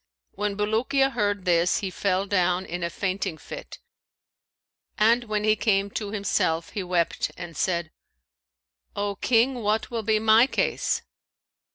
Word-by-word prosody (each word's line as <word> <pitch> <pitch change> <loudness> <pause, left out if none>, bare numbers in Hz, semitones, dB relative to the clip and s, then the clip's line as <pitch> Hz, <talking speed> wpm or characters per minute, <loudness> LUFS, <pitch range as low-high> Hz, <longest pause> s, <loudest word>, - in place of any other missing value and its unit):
When 205 0 -3
Bulukiya 255 +6 +1
heard 205 -5 -1
this, 175 0 +3
he 195 -2 -3
fell 190 +1 0
down 185 -2 +1
in 175 +1 -5
a 170 - -1
fainting 185 -3 -3
fit, - - -9 1.2
and 230 +3 +3
when 210 -1 -1
he 215 0 +4
came 200 -2 +1
to 210 0 -4
himself, 180 -5 0
he 205 - -3
wept 180 -2 0
and 170 -2 -8
said, 170 -2 -1 1.0
'O 200 -1 -2
King 245 +4 +2
what 215 +3 0
will 230 -1 -2
be 220 0 +2
my 220 +3 +5
case?' - - 0
205 Hz, 145 wpm, -25 LUFS, 185-220 Hz, 1.2 s, my